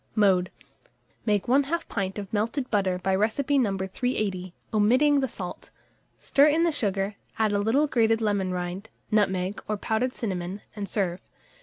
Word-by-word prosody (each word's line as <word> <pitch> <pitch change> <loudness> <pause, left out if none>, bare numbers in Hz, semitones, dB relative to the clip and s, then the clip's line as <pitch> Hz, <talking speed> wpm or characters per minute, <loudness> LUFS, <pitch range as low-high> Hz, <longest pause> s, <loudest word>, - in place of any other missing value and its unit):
Mode. 190 -4 +3 0.8
Make 205 -3 +2
1/2 285 +6 +1
pint 195 -2 -3
of 200 -1 -7
melted 230 +5 -1
butter 190 -4 +1
by 190 +1 -1
recipe 240 +8 +1
No. 200 -6 +1
380, 190 -2 -2 0.2
omitting 255 +8 +4
the 265 - 0
salt; 185 -6 -7 0.5
stir 280 +2 +4
in 315 +3 +3
the 340 - +3
sugar, 200 -6 -1 0.2
add 220 -1 +2
a 205 - +1
little 230 +9 +3
grated 225 -5 +2
lemon 200 -4 0
rind, 180 +4 -4 0.2
nutmeg, 190 -2 +1
or 215 - -1
powdered 230 +5 -1
cinnamon, 190 -2 -4
and 200 -2 -5
serve. 185 -3 -1
210 Hz, 155 wpm, -26 LUFS, 190-245 Hz, 0.8 s, omitting